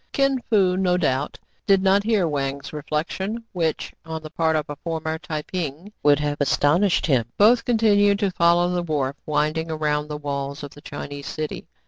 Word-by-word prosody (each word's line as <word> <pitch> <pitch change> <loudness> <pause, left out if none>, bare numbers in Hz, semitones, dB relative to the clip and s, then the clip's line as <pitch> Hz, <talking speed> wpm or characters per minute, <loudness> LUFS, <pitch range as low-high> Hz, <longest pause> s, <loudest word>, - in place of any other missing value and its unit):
Kin 275 -1 +2
Fo, 195 -5 +3
no 180 -1 +2
doubt, 145 -4 -1 0.3
did 195 -1 +4
not 195 +1 +4
hear 210 -4 +1
Wang's 140 -1 -3
reflec 150 +1 -3
tion, 215 +5 -4
which, 165 -4 -2
on 160 -1 -6
the 155 - -8
part 160 -1 +1
of 155 -1 -1
a 145 - -5
former 160 0 -3
Tai 155 -2 -4
ping, 175 +3 -5
would 145 0 +5
have 145 0 -2
astonished 170 +7 +3
him. 130 -7 +2
Both 230 +3 +5
continued 205 -4 +4
to 200 -2 0
follow 170 0 +3
the 180 -1 0
wharf, 145 -5 -1
winding 155 +2 0
around 150 -1 -1
the 150 0 -5
walls 140 0 -4
of 145 - -7
the 145 - -14
Chinese 145 -1 -7
city. 155 -1 -5
160 Hz, 185 wpm, -23 LUFS, 145-190 Hz, 0.3 s, would